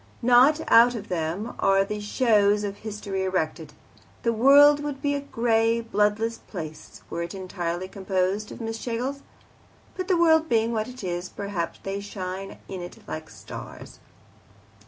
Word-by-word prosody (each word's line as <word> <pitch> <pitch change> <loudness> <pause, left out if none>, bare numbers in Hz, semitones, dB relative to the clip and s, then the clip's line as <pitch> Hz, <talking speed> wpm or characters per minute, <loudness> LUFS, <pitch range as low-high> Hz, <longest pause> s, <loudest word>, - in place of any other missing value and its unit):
Not 250 +6 +6
out 240 +2 +6
of 210 -2 -7
them 180 +6 -2
are 195 0 +3
the 210 +1 -4
shows 210 -2 +2
of 200 -1 -4
history 205 -3 -4
erected: 165 -4 -2 0.5
the 230 - +2
world 285 +5 +7
would 290 -2 -4
be 285 0 0
a 285 - -1
grey, 230 -3 +1
bloodless 225 0 0
place 160 -5 -9
were 170 - -3
it 170 +3 -5
entirely 180 -1 -4
composed 190 +1 -1
of - - -9
Miss 225 -1 -4
Schlegels. 255 +5 -3 0.7
But 370 -1 -4
the 370 -3 +3
world 320 -1 +4
being 230 0 +2
what 215 -1 -1
it 250 -3 -10
is, 175 0 -3
perhaps 200 -4 -4
they 195 +1 -3
shine 195 -1 -6
out - - -17
in 190 -2 -6
it 175 - -8
like 155 0 -6
stars. - - -10
210 Hz, 160 wpm, -25 LUFS, 190-240 Hz, 0.7 s, world